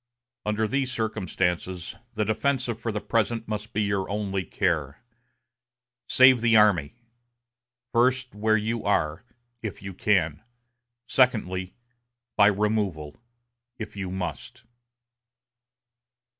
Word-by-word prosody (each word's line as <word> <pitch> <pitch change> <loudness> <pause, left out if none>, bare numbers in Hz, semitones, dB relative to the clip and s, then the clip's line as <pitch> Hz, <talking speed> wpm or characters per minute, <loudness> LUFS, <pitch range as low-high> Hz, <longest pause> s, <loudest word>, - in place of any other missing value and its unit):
Under 105 +1 +1
these 135 +1 -1
circumstances, 95 -6 -2 0.2
the 110 0 0
defensive 120 +1 0
for 115 - -2
the 105 - -2
present 115 +1 -1
must 105 0 -4
be 105 - 0
your 100 -2 -1
only 100 -2 -2
care. 80 - -1 1.1
Save 130 -2 +6
the 115 -1 +4
army 100 -6 +4 1.0
first, 125 +2 +2
where 110 +1 +2
you 110 +2 -2
are, 80 -5 0 0.4
if 105 -3 -6
you 95 0 -6
can; 85 -6 +1 0.7
secondly, 95 -8 +1 0.6
by 100 - +6
removal, 100 -8 0 0.6
if 110 -2 -7
you 100 -2 -4
must." 95 - -5
105 Hz, 105 wpm, -26 LUFS, 95-115 Hz, 1.1 s, Save